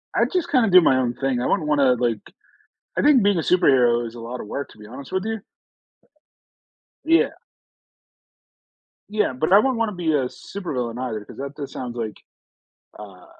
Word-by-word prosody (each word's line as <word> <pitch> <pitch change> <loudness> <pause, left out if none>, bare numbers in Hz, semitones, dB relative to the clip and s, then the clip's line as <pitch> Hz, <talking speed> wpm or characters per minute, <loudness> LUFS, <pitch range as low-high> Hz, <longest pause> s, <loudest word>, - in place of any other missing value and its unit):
I - - +3
just 355 -2 -1
kinda 250 -6 +3
do 185 -1 +8
my 130 -5 +3
own 125 -2 0
thing. 135 -3 -1
I - - -2
wouldn't 160 -6 0
wanna, 140 -4 +3
like 120 -3 -1 0.8
I - - +2
think 285 -6 +5
being 200 -3 +3
a - - 0
superhero 125 -10 +3
is 115 - -9
a 120 - -9
lotta 120 +2 -6
work, 140 +6 -5
to - - -18
be 105 - -12
honest 130 +4 -10
with 190 +1 -1
you. 220 0 -3 1.7
Yeah. 330 +1 +3 1.8
Yeah, 210 -9 0
but 145 +7 -2
I 195 - +8
wouldn't 255 +2 +2
wanna 230 -2 0
be 170 -3 -1
a 140 -3 +1
supervillain 125 -6 -5
either 115 -5 -4
'cause - - -13
that 140 +1 -6
just 140 -2 -7
sounds 125 -2 -6
like 110 -3 -4 0.8
uh, 95 -4 -12
140 Hz, 185 wpm, -22 LUFS, 120-195 Hz, 1.8 s, do